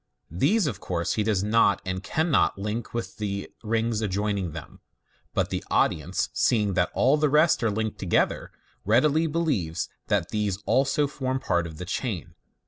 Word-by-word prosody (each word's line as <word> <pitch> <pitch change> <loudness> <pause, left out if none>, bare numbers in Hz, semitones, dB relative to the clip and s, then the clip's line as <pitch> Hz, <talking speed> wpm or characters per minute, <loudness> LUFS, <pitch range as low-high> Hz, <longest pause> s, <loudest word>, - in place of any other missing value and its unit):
These, 170 - +2
of 115 -10 -2
course, 85 -2 -2
he 110 - 0
does 105 -3 +1
not 105 -2 +3
and 95 0 -3
canhot 160 - +1
link 105 +4 -4
with 120 0 -5
the 100 -2 -4
rings 115 0 0
adjoining 100 -3 -1
them, 75 -1 -9 0.6
but - - 0
the - - -2
audience 80 +5 +1
seeing 105 -5 +2
that 90 0 +1
all 135 +4 +4
the 150 -1 +2
rest 155 +3 +4
are 115 - +2
linked 110 +1 -2
together, 90 -3 0 0.3
readily 150 - +3
believe 145 - -1 0.3
that - - +1
these 105 -3 -1
also 135 +2 +2
form 130 -2 -2
part 85 -7 0
of 80 -1 -10
the 90 - -6
chain. 100 - -3
105 Hz, 165 wpm, -26 LUFS, 95-130 Hz, 0.6 s, all